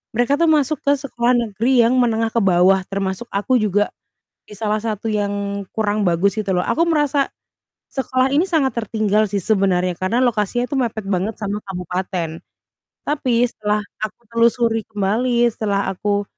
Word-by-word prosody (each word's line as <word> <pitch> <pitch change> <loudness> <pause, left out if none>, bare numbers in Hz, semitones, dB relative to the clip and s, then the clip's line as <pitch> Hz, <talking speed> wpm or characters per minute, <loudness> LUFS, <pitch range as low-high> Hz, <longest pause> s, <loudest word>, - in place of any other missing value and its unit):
mereka 245 +4 +2
tuh 335 -1 +4
masuk 300 -1 +2
ke 285 - +4
sekolah 245 -3 0
negeri 235 +2 +1
yang 235 +3 +3
menengah 230 -2 +2
ke 230 - +2
bawah 190 +1 +4
termasuk 195 +2 -2
aku 205 +6 +1
juga, 205 0 +1 0.6
di - - -12
salah 215 -1 0
satu 220 -1 -3
yang 200 -1 -2
kurang 210 -1 0
bagus 180 +3 +2
gitu 200 -2 -2
loh, 180 - +1
aku 330 - +2
merasa 295 -3 +2 0.6
sekolah 260 0 0
ini 315 +6 +3
sangat 290 -9 +1
tertinggal 215 0 +1
sih 200 -1 -1
sebenarnya 185 -3 +1
karena 225 +7 0
lokasinya 240 +1 0
itu 280 - -3
mepet 220 -4 -2
banget 195 +3 0
sama 205 0 -2 0.2
kabupaten, 180 -2 -3 0.7
tapi 255 -5 +1
setelah 210 -1 -1 0.2
aku 215 - -10
telusuri 230 -1 +2
kembali 235 +4 +1
setelah 205 -3 -1
aku, 205 +2 -1
215 Hz, 160 wpm, -20 LUFS, 200-245 Hz, 0.7 s, tuh